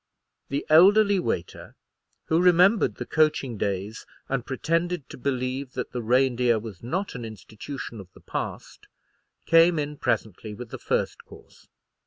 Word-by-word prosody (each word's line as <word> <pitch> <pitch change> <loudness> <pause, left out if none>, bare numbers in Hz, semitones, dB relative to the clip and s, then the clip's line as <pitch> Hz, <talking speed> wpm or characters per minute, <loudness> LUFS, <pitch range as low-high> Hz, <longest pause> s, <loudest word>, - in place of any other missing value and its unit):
The 140 +1 -2
elderly 200 +5 +6
waiter, 90 - -4 0.5
who 160 +2 +2
remembered 180 +4 +4
the - - -6
coaching 155 -6 +1
days, 100 +2 -3 0.2
and 135 -3 -2
pretended 165 +4 -2
to - - -8
believe 130 0 -2
that 125 - -4
the 125 - -4
Reindeer 125 0 +2
was 105 -4 -8
not 180 +12 -3
an 125 - -7
institution 110 - -8
of 95 -2 -12
the - - -16
past, - - -6 0.6
came 165 +1 +5
in 150 0 -3
presently 110 -2 -2
with 120 +1 -9
the - - -7
first - - -2
course. - - -17
130 Hz, 145 wpm, -25 LUFS, 115-165 Hz, 0.6 s, elderly